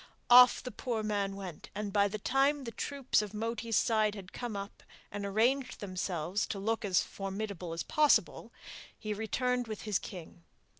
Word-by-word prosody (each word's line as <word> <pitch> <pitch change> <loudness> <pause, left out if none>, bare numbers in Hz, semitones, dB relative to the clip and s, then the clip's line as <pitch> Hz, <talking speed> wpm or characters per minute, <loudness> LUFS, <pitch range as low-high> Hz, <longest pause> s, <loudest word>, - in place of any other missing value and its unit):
Off 250 0 +8
the 250 - -5
poor 230 0 -3
man 200 -2 -1
went, 185 -5 -8
and 205 -1 -4
by 205 -1 +4
the 210 +2 -4
time 275 +6 +2
the 230 - -5
troops 275 -2 0
of 210 0 -6
Moti's 225 0 -1
side 215 -2 +2
had 195 -2 -10
come 240 -4 -4
up 200 +1 -7 0.3
and 205 0 -4
arranged 250 +6 +1
themselves 185 -1 -2
to 205 - -4
look 225 +4 -1
as 190 -3 +2
formidable 195 -3 -5
as 165 0 -3
possible, 305 -2 +2 0.5
he 215 -1 -4
returned 245 +3 -1
with 215 -2 -6
his 210 -3 0
king. 175 -2 -10
210 Hz, 170 wpm, -32 LUFS, 195-235 Hz, 0.5 s, Off